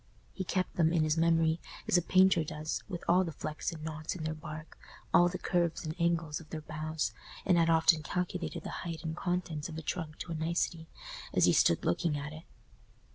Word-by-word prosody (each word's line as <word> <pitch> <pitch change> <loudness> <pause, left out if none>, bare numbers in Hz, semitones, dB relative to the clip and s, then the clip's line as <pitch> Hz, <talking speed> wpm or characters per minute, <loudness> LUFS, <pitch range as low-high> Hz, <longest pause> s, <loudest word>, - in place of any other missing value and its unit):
He 190 - -3
kept 185 0 -2
them 165 -2 +4
in 165 -2 +3
his 155 0 +2
memory, 165 0 +3 0.3
as - - +3
a 175 - +6
painter 185 -1 +5
does, 155 +1 -4
with 175 -3 -5
all 180 +2 +5
the 165 - -4
flecks 155 +1 -4
and 160 -2 -8
knots 155 +1 -4
in 170 - -6
their 155 0 -1
bark, 155 0 -8 0.4
all 175 0 +6
the 185 - -4
curves 175 -2 0
and 155 - -3
angles 170 -3 +1
of 165 - -14
their 155 - -5
boughs, 155 0 -3 0.3
and 185 - +4
had 165 -1 +4
often 160 -1 +5
calculated 180 +3 -3
the - - -5
height 165 -2 -5
and 160 -1 -3
contents 175 -4 -2
of 160 - -6
a 160 - -5
trunk 160 -2 -4
to 170 - -6
a - - -1
nicety, 165 0 -1 0.5
as - - +6
he - - +5
stood - - +4
looking 160 -4 +1
at 150 +2 -5
it. 160 +2 -10
165 Hz, 215 wpm, -32 LUFS, 155-175 Hz, 0.5 s, a